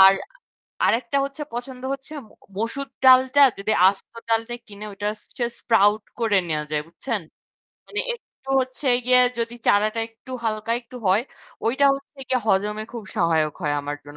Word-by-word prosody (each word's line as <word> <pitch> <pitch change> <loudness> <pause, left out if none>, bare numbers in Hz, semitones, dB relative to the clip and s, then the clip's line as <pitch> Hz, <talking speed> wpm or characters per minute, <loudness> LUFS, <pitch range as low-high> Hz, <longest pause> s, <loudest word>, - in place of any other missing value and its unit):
আর 190 0 +9 0.7
আরেকটা 235 +3 +1
হচ্ছে 275 +2 -5
পছন্দ 250 +1 -6
হচ্ছে 275 +2 -9 0.2
ম - - -27 0.3
মসুর 230 +6 -2 0.2
ডালটা 260 +2 +7 0.2
যদি 200 +2 0 0.2
আস্ত 195 0 -4 0.2
ডালটা 225 +1 +1
নিয়ে - - -20
কিনে 205 0 -9
ওটা 205 +1 -2 0.3
just 240 -1 -1
sprout 210 -2 +3 0.2
করে 220 -4 +3
নেয়া 155 -1 0
যায়, 150 -1 0
বুঝছেন? 210 +6 -3 0.7
মানে 415 - -2
একটু 270 - -13
হচ্ছে 255 +3 -3 0.2
গিয়ে 250 0 +6 0.2
যদি 230 0 -2
চারাটা 215 +2 +3
একটু 225 +3 -17
হালকা 220 0 -1
একটু 245 +1 -13
হয়, 195 +5 +4 0.4
ওইটা 265 +5 +2
হচ্ছে 275 +1 -11
গিয়ে 255 - +2
হজমে 210 +1 +1
খুব 235 -3 -6
সহায়ক 160 -5 +2
হয় 145 -2 +1
আমার 145 +1 -4
জন্য। 145 0 -12
225 Hz, 165 wpm, -23 LUFS, 200-255 Hz, 0.7 s, আর